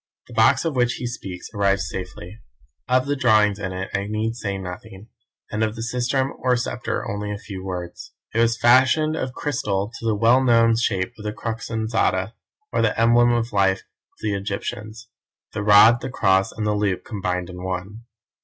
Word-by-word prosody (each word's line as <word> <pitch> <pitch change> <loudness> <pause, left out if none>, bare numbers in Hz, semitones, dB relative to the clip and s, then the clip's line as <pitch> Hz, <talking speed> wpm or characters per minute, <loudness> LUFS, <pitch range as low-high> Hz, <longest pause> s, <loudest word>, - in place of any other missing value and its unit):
The - - -14
box - - +4
of 160 -4 -1
which 125 -1 +2
he - - -5
speaks 95 -7 -7
arrived 100 -1 +2
safely. 90 +3 -7 0.5
Of 130 0 +3
the 145 0 0
drawings 110 -6 +3
in 95 -2 -3
it 95 +1 -5
I 100 +1 -1
need 110 +2 -2
say 100 -5 -3
nothing, 95 +3 -9 0.4
and 105 - -2
of 110 0 -1
the 115 - -5
sistrum 125 +3 0
or 125 -1 +2
sceptre 120 - -3
only 105 +1 -4
a 105 - -3
few 100 -3 -8
words. 90 -2 -6 0.2
It 115 - 0
was 115 0 +3
fashioned 130 +7 +4
of 130 -5 -3
crystal 105 -9 -2
to - - -8
the 110 - +2
well 115 +5 +4
known 115 -2 +4
shape 95 -5 -1
of - - -9
the 105 - -2
Crux 115 +1 -5
ansata, 110 -3 0 0.4
or - - +2
the 115 -1 +1
emblem 120 +1 +5
of 120 0 -1
life 95 -1 +2
of - - -38
the 105 -1 -1
Egyptians; 105 +3 -5 0.5
the - - -3
rod, 105 +3 +7
the - - -4
cross 95 -6 +2
and 110 - -4
the 105 - +1
loop 105 -3 -1
combined 90 -4 -3
in 90 0 -9
one. 95 +5 -5
110 Hz, 190 wpm, -22 LUFS, 95-120 Hz, 0.5 s, rod